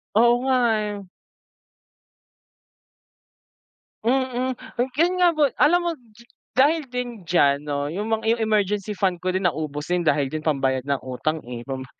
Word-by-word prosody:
Oo 235 +2 +6
nga, 265 -1 +2 0.3
eh. 205 -1 -5 3.0
Mm, 255 0 0 0.2
yung 255 - -1
gan 345 +4 +3
nga 350 - +6
po, 295 - +5 0.2
alam 345 +4 +5
mo 345 - +1
d 235 -4 -19 0.3
dahil 300 +5 +3
din 245 -5 -5
diyan 145 -5 +2
'no, 145 -1 -2
yung 205 +8 -4
mga 220 0 0
yung 230 - -6
emergency 210 -1 0
fund 185 -3 0
ko 185 - 0
din 185 0 -1
naubos 150 -2 -4
din, 180 0 +1
dahil 145 -3 +2
din 155 +3 -5
pambayad 135 -4 0
ng 140 0 -1
utang, 155 +5 -2
eh. 120 -1 -6
Pam 130 0 -5
200 Hz, 155 wpm, -23 LUFS, 150-245 Hz, 3.0 s, Oo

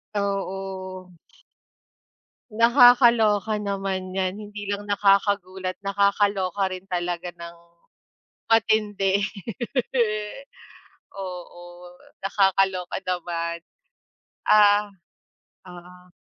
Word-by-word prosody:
Oo. 190 -2 -4 1.4
Nakakaloka 230 -3 +5
naman 195 -2 -3
'yan. 190 0 -2
Hindi 205 -1 -8
lang 200 0 -3
nakakagulat. 195 -2 +1
Nakakaloka 200 -1 +1
rin 185 0 -7
talaga 175 -1 -3
ng 170 0 -11 0.9
matindi. 210 -3 +2 1.9
Oo, 175 -2 -9 0.3
nakakaloka 190 -2 +1
naman. 170 -2 -3 0.9
Ah, 205 0 +5 0.8
oo. 180 0 -14
195 Hz, 65 wpm, -24 LUFS, 180-205 Hz, 1.9 s, Nakakaloka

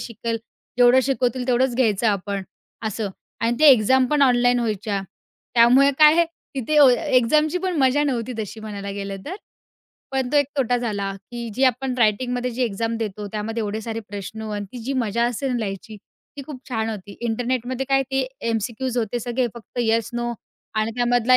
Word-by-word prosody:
शिकेल 230 0 -4 0.4
जेवढं 245 +1 +6
शिकवतील, 255 -1 0
तेवढंच 250 0 +2
घ्यायचं 225 -3 +2
आपण. 200 -1 -1 0.4
असं. 215 -1 -2 0.3
आणि 235 +1 +1
ते 310 - +7
एक्झाम 255 +2 +5
पण 295 -1 +3
ऑनलाईन 245 -1 +4
व्हायच्या. 210 -2 -1 0.5
त्यामुळे 250 +4 +6
काय 305 0 +8
आहे, 340 0 +4 0.3
तिथे 275 +4 -1
अ, 285 - +9 0.3
एक्झामची 305 +8 +3
पण 365 -2 -2
मजा 270 +2 +3
नव्हती 250 -3 -1
तशी 220 +1 -5
म्हणायला 200 -2 -6
गेलं 195 0 -5
तर. 370 +5 -4 0.7
पण 265 -2 -1
तो - - +3
एक 285 -2 +4
तोटा 245 -2 +2
झाला. 205 -5 -2 0.2
की 235 -1 -5
जी 265 +2 +2
आपण 255 +1 +1
रायटिंगमध्ये 245 +3 +1
जी 250 +2 -2
एक्झाम 225 +1 -1
देतो, 210 -2 -4
त्यामध्ये 220 +2 -3
एवढे 210 +1 -3
सारे 225 0 -4
प्रश्न 205 +2 -7
आणि 205 0 -3
ती 250 - -7
जी 275 - -2
मजा 235 -2 0
असेल 250 +1 -2
लिहायची, 210 0 -5
ती 280 +7 -14
खूप 280 -5 -8
छान 225 -2 -1
होती. 200 -1 -8
इंटरनेटमध्ये 245 +2 -2
काय 270 0 +3
ते 265 -1 0 0.2
एम-सी-क्यूज 235 +3 -2
होते 235 +1 -1
सगळे 245 +2 -1
फक्त 235 +1 -11
येस, 225 -1 +1
नो 240 0 -2 0.4
आणि 215 +1 0
त्यामधला 245 +1 +4
240 Hz, 175 wpm, -22 LUFS, 220-260 Hz, 0.7 s, अ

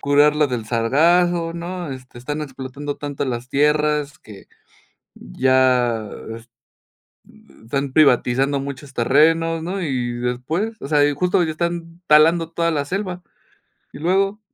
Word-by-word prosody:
curarla 150 +1 +3
del 125 -4 -4
sargazo, 165 +9 +2
¿no?, 175 -1 -5
este, 130 -1 -12
están 145 +5 -4
explotando 135 +1 -6
tanto 145 -1 -4
las 125 0 -4
tierras 150 0 +1
que, 105 -3 -14 0.7
ya 125 - +1 0.3
es 115 +1 -14 0.9
uh, 70 +9 -21
están 140 +3 -3
privatizando 135 -1 +3
muchos 140 0 -7
terrenos, 160 +6 +2
¿no?, 190 +3 -3
y 130 -7 -2
después, 125 - -3
o 135 - -5
sea, 145 -2 +4
y 145 - 0
justo 180 +5 +1
ya 160 - -1
están 170 +1 -4
talando 165 +2 +5
toda 170 0 0
la 145 -3 -1
selva. 180 +1 -4 0.7
Y - - -10
luego, 195 +5 +1
145 Hz, 135 wpm, -20 LUFS, 130-165 Hz, 0.9 s, talando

